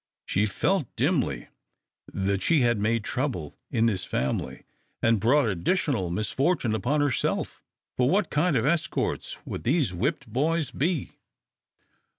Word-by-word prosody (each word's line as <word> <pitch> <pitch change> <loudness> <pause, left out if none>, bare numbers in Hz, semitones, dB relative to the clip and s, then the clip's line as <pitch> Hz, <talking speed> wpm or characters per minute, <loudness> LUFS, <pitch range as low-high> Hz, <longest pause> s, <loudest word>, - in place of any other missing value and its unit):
She 105 +3 +1
felt 165 - 0
dimly 125 - 0 0.6
that 95 0 -1
she 160 -4 +3
had 120 -3 +2
made 110 +2 +1
trouble 120 - -3
in 115 0 +2
this 100 -6 +1
family, 65 - -2 0.4
and 115 -1 +3
brought 130 +7 +4
additional 105 - 0
misfortune 120 - 0
upon 125 +8 +1
herself, 145 -3 -1 0.4
for 125 0 +3
what 195 +2 +1
kind 150 +1 +2
of 115 - +2
escorts 165 +2 -1
would - - -5
these 130 - +1
whipped 140 - -1
boys 155 +3 0
be? 155 -1 -1
125 Hz, 135 wpm, -26 LUFS, 105-150 Hz, 0.6 s, brought